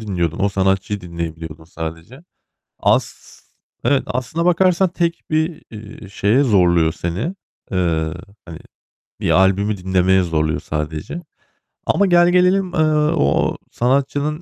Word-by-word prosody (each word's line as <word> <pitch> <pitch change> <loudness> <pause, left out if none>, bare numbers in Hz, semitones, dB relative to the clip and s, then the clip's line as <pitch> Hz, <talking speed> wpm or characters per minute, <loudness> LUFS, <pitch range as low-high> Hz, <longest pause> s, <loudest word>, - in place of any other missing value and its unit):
dinliyordun. 90 -7 -2
O 100 +1 +2
sanatçıyı 95 +1 0
dinleyebiliyordun 80 -2 -7
sadece. 80 - -8 0.6
As - - +2 0.7
evet, 140 -2 +3
aslında 130 +7 -2
bakarsan 180 +1 +3
tek 170 -1 -2
bir, 155 +1 -1
eee, 110 -1 -10
şeye 105 +7 +2
zorluyor 85 - +3
seni. 90 - -3 0.4
Eee, 85 -4 0 0.3
hani, 80 -2 -9 0.6
bir - - 0
albümü 100 +2 +3
dinlemeye 95 0 +2
zorluyor 80 -3 -1
sadece. 75 - -5 0.6
Ama 200 - +2
gelgelelim, 180 +1 +3
eee, - - -1 0.4
o 70 - +1
sanatçının 140 +5 0
100 Hz, 110 wpm, -19 LUFS, -, 0.7 s, evet